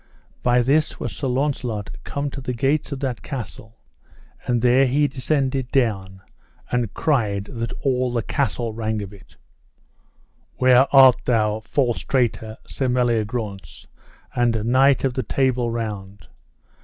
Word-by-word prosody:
By 125 0 +3
this 150 +5 +1
was - - -5
Sir 140 - -3
Launcelot 125 -5 -2
come 140 0 -4
to 135 - -7
the 125 -1 -4
gates 140 +5 0
of 140 -1 -5
that 130 -4 -3
castle, 115 -3 -8 0.7
and 120 -1 0
there 130 +2 +5
he 145 +3 +2
descended 135 -1 -1
down, 95 -8 -1 0.5
and 120 -4 0
cried, 110 -10 0
that 115 -1 -4
all 130 -2 +1
the 120 -2 -1
castle 120 -5 -2
rang 110 -1 -2
of 100 0 -9
it: 100 - -17 1.2
Where 130 +1 +5
art 135 -2 +8
thou, 110 -3 +1
false 120 +1 -1
traitor, 115 -4 -1
Sir 135 - -3
Meliagrance, 110 -8 -2 0.5
and 115 -3 +1
knight 130 +3 +4
of 135 -2 +1
the 130 - -1
Table 130 -3 0
Round? 105 -5 -5
125 Hz, 140 wpm, -22 LUFS, 110-135 Hz, 1.2 s, art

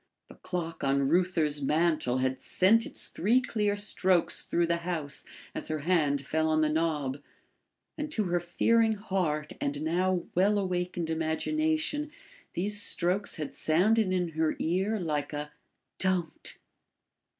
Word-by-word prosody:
The - - -12
clock 175 -3 -5
on 140 0 +2
Reuther's 165 -4 +2
mantel 150 -3 +1
had 130 0 -1
sent 225 +5 +3
its - - -4
three 220 +9 +2
clear 210 -5 0
strokes 190 -4 +1
through 170 - 0
the 170 0 +1
house 170 -4 -4 0.3
as - - -4
her 155 -1 -3
hand 145 -4 +1
fell 160 +2 0
on 155 0 +2
the 155 - +3
knob, 150 -4 -1 0.8
and 300 0 -3
to 220 -8 0
her 175 -2 0
fearing 225 +6 +2
heart 180 -7 -2
and 145 +1 -2
now 180 +2 +1
well 200 +4 +3
awakened 180 -3 -2
imagination 300 - 0 0.4
these 205 +3 0
strokes 185 +1 +1
had 155 -2 -5
sounded 190 +6 +2
in 180 -2 0
her 160 0 0
ear 190 +6 0
like 150 -4 -2
a 150 0 -4 0.5
"DON'T! 185 -4 -1
175 Hz, 140 wpm, -29 LUFS, 155-195 Hz, 0.8 s, sent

